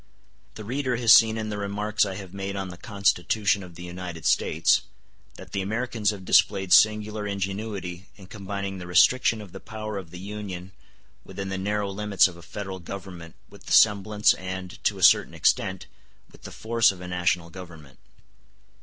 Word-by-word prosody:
The 110 - -8
reader 130 +3 -2
has 115 -2 +6
seen 110 0 +6
in 110 -1 -4
the 105 -1 -4
remarks 105 +1 0
I 95 - -5
have 95 -2 -9
made 100 0 -5
on 95 -1 -4
the 90 - -9
Constitution 100 0 0
of 90 -3 -12
the 90 - -10
United 90 -2 -7
States - - +3 0.5
that - - -13
the 100 - -2
Americans 110 +1 -1
have 100 -3 -5
displayed 95 -1 +3
singular 105 -1 +3
ingenuity 100 -2 -5
in 100 - -14
combining 100 0 -6
the 90 - -8
restriction 115 +5 +4
of 100 -4 -11
the - - -9
power 110 -2 -6
of 90 -4 -11
the 90 - -10
Union 95 -2 -7 0.5
within 100 -1 -7
the 95 - -3
narrow 100 +1 -2
limits 100 -1 +3
of 90 - -10
a 85 - -13
federal 95 +3 -7
government 90 -2 -9
with - - -17
the - - -1
semblance 105 0 +4
and, 95 +2 -7
to 100 - +1
a 95 - -5
certain - - +5
extent, 95 -2 +1 0.5
with - - -18
the - - -8
force 115 -1 +2
of 95 - -12
a 90 - -8
national 90 -1 -1
government. 80 -7 -12
100 Hz, 180 wpm, -25 LUFS, 90-105 Hz, 0.5 s, has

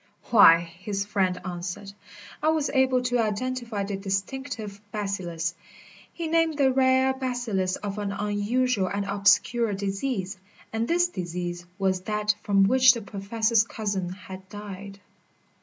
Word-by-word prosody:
"Why," 165 -7 +8
his 190 +4 -5
friend 190 -3 0
answered, 180 +2 -5 0.5
"I 305 - 0
was 315 -2 +2
able 260 -2 +3
to 245 -1 +1
identify 230 0 -2
the 195 0 -3
distinctive 205 +2 -4
bacillus 180 -5 -3 0.3
" - - -22
He 335 - -5
named 325 -1 +2
the 265 -2 +3
rare 260 0 +3
bacillus 245 -8 -1
of 205 0 -5
an 205 -1 -2
unusual 210 +2 0
and 200 +1 -2
obscure 200 +3 +3
disease. 195 0 -3 0.3
And 225 +1 -1
this 350 +3 +3
disease 175 - -5
was 190 -2 0
that 210 +1 0
from 200 -2 +3
which 255 +4 +6
the 235 - -5
Professor's 215 +3 +1
cousin 200 -5 -3
had 190 0 -10
died. 200 -1 -8
205 Hz, 140 wpm, -26 LUFS, 195-250 Hz, 0.5 s, Why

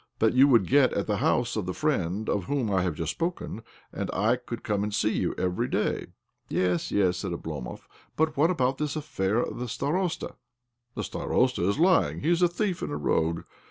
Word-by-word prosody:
That 110 0 +3
you 130 +2 +6
would 115 -8 +5
get 135 +4 +4
at - - -1
the 105 -1 0
house 120 +3 +1
of 105 -5 -2
the 90 - -3
friend 105 - -1
of 100 -3 0
whom 125 -2 -1
I 95 -2 +2
have 90 -4 -1
just 80 0 -2
spoken; 170 - -3 0.3
and - - -3
I 110 +5 +3
could 120 -1 -7
come 105 -2 0
to 105 +1 -1
see 105 +1 +1
you 90 - -1
every 90 -1 0
day." - - -1 0.2
" - - -52
Yes, 90 -2 0
yes," 95 -3 +2
said 95 -1 -3
Oblomov. 75 -6 -6 0.2
" - - -31
But 155 0 +1
what 155 +4 +3
about 135 -7 +1
this 150 0 -1
affair 110 -10 -1
of - - -5
the 125 - -3
starosta} 165 - -2 0.2
" 120 0 -56
" 120 0 -50
The - - -3
starosta 125 -8 0
is 100 - 0
lying. 175 +2 +3
He 160 - +1
is 175 0 +2
a 175 - +6
thief 180 +1 -2
and - - -3
a 75 - -2
rogue. 80 +2 0
115 Hz, 230 wpm, -27 LUFS, 95-145 Hz, 0.3 s, you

